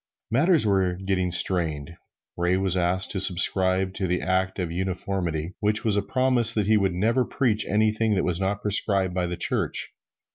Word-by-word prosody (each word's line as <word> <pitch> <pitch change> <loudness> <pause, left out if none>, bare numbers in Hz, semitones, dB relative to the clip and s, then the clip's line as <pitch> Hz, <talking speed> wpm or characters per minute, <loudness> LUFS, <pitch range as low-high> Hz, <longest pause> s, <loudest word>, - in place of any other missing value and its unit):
Matters 155 +3 +3
were 95 -3 +1
getting 95 -1 -1
strained. 85 -4 -1 0.4
Ray 90 +1 +1
was 95 -1 +1
asked 90 +1 0
to 95 - -2
subscribe 95 +1 +2
to 95 -1 -3
the 90 +1 0
Act 95 0 0
of 90 -4 -3
Uniformity, 90 -2 -3
which 105 +1 0
was 105 -2 +2
a 100 - +2
promise 125 -3 +1
that 105 -2 +1
he 110 +2 +3
would 95 -4 +1
never 115 +7 +1
preach 120 -5 0
anything 110 +1 +1
that 95 - 0
was 90 -1 -1
not 100 +1 -2
prescribed 100 -2 +1
by 90 -1 -1
the 85 0 -5
Church. - - -2
95 Hz, 180 wpm, -25 LUFS, 90-105 Hz, 0.4 s, Matters